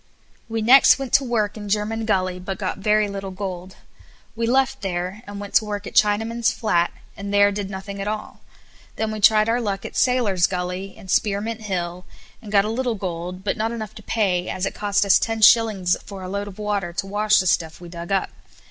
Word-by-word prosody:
We 225 -1 -2
next 255 +3 +7
went 270 -2 -6
to 275 - +5
work 215 -5 -1
in 205 -2 -7
German 215 +2 -1
Gully, 185 -4 0
but 190 +1 -5
got 190 -1 -3
very 210 +1 +2
little 195 -1 -5
gold. 185 -1 -6 0.6
We 230 0 -1
left 260 0 +1
there 185 +1 -3
and 205 0 -7
went 205 -1 -8
to 220 - -1
work 205 -1 -4
at - - -8
Chinaman's 225 +3 +2
Flat, 175 -6 +1 0.2
and 200 0 -6
there 205 0 +5
did 200 -1 -4
nothing 195 0 -6
at 200 - -4
all. 215 0 -5 0.5
Then 220 -1 -2
we 215 - -4
tried 215 +1 +5
our 235 +2 +1
luck 200 -3 -3
at - - -7
Sailor's 225 -9 +2
Gully, 180 +1 -4
and 190 -4 -8
Spearmint 215 +2 0
Hill, 180 -3 -4 0.4
and 215 -4 -10
got 200 -1 +4
a 215 - -2
little 245 0 -1
gold, 180 -1 -5
but 205 - -1
not 225 +1 -1
enough 220 -3 -6
to - - -11
pay, 190 -5 0
as 185 - -2
it - - -3
cost 205 0 0
us 200 - +5
ten 225 -1 -2
shillings 205 -6 +5
a 190 -2 -9
load 200 +1 -4
for 215 - -9
water 200 -4 -2
to 195 - -3
wash 210 +2 +2
the 185 - +2
stuff 165 -3 0
we 175 - -10
dug 170 +1 -8
up. 195 -1 0
205 Hz, 215 wpm, -22 LUFS, 190-220 Hz, 0.6 s, next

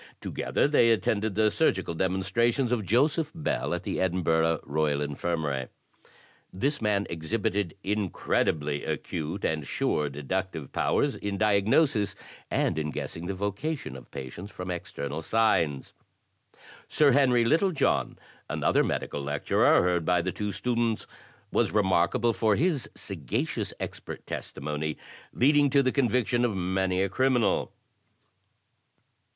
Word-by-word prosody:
To - - -5
gether - - +1
they 145 -5 +4
attended 110 -2 +1
the 110 0 +3
surgical 95 - +1
demonstrations 95 - +1
of 110 -6 -1
Joseph 145 - +2
Bell, 160 - -2
at - - -5
the - - -2
Edinburgh 80 -3 +1
Royal 75 -1 0
Infirmary. 75 -2 -2 0.8
This 140 +11 -1
man 105 -2 +1
exhibited 100 +2 -2
incredibly 80 -7 0
acute 85 +4 -3
and 80 -2 -1
sure 75 +1 0
deductive 75 +2 -4
powers 145 -1 +1
in 100 -1 -3
diagnosis 105 +3 +2 0.3
and 80 - 0
in 75 -1 -2
guessing 80 +3 -5
the 100 - -3
vocation 100 +11 -3
of - - -11
patients 70 +9 -7
from 90 -2 -6
external 75 -3 -5
signs. 85 -8 +1 0.9
Sir 150 -2 +4
Henry 125 -3 +4
Littlejohn, 165 +5 +1 0.3
another - - +2
medical 70 - -2
lecturer, 75 +4 +3
heard 90 -1 +1
by 90 +1 +2
the 95 - -1
two 105 +3 -3
students, 115 +3 -1 0.5
was - - +2
remarkable 100 +3 +2
for 110 -1 +2
his 155 - 0
sagacious 80 -11 -3
expert - - -7
testimony, 75 +2 -4 0.3
leading 145 +2 +4
to 140 +1 +4
the 130 - +2
conviction 125 -2 +1
of 115 -4 +1
many 95 0 0
a - - +1
criminal. 125 +3 +1
100 Hz, 125 wpm, -27 LUFS, 80-120 Hz, 0.9 s, they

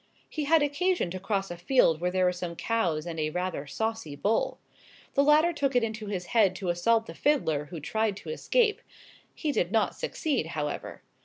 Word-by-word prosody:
He 305 -2 -3
had 315 +1 +4
occasion 290 - 0
to 185 - -4
cross 195 -1 -2
a 175 - -6
field 170 -4 +3
where 180 - +1
there 185 0 +1
were 180 - +4
some 175 -1 -5
cows 175 -8 0
and 165 -2 -5
a 155 0 0
rather 180 -3 -3
saucy 220 -4 -3
bull. 210 +9 0 0.6
The 280 - +4
latter 305 +4 +5
took 275 -4 -1
it 245 - +4
into 220 -1 -3
his 190 -3 -3
head 205 -6 +4
to 185 -2 -3
assault 225 +6 +2
the - - -8
fiddler, 160 - +1
who 160 +2 -7
tried 215 +6 -1
to - - -7
escape. 470 -2 +1 0.5
He 305 - -1
did - - 0
not - - +2
succeed, 305 - -1
however. 150 -2 -4
205 Hz, 200 wpm, -28 LUFS, 175-280 Hz, 0.6 s, latter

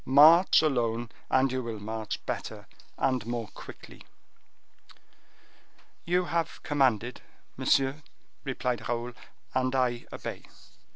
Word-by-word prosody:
March 160 +7 +7
alone, 120 -5 0 0.2
and 130 0 +3
you 130 0 -1
will 115 -3 -5
march 110 0 -5
better, - - -4 0.3
and 130 -4 +1
more 120 -3 -3
quickly." - - -12 2.0
"You 180 +1 +2
have 165 -1 -2
commanded, 125 -6 +1 0.3
monsieur," 135 +2 +2 0.4
replied 125 -4 -2
Raoul, 120 +1 -2 0.4
"and 130 0 +1
I 125 -2 0
obey." - - -6
130 Hz, 105 wpm, -29 LUFS, 120-140 Hz, 2.0 s, March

